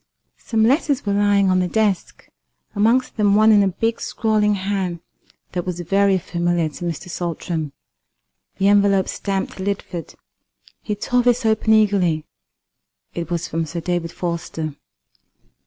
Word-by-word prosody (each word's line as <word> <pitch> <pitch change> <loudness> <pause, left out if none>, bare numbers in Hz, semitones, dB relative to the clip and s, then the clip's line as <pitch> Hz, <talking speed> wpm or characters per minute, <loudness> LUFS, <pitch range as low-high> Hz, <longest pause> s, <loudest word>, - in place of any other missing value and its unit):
Some 225 -2 0
letters 275 +2 +2
were 200 - 0
lying 200 -1 +3
on 185 - +3
the 180 - +1
desk, 210 -1 -1 0.5
amongst 230 +6 +2
them 205 -2 +3
one 215 +1 +6
in 210 -1 +6
a 200 - +3
big 225 +5 -1
scrawling 215 -2 +1
hand 190 -3 -2 0.5
that 175 -1 -2
was 180 -1 -4
very 195 +2 +2
familiar 175 -2 -1
to 165 +4 -8
Mr. 170 +1 -4
Saltram, 170 -3 -3 0.9
the 195 - +2
envelope 200 -1 +4
stamped 195 -1 -3
"Lidford." 190 -3 -4 0.7
He 210 - -3
tore 245 +4 +1
this 245 -1 +2
open 220 0 +3
eagerly. 190 -7 +2 0.9
It 170 -1 -5
was 170 -2 -2
from 165 +1 -2
Sir 170 +3 -4
David 170 0 -2
Forster. 165 -3 -4
195 Hz, 140 wpm, -21 LUFS, 175-210 Hz, 0.9 s, one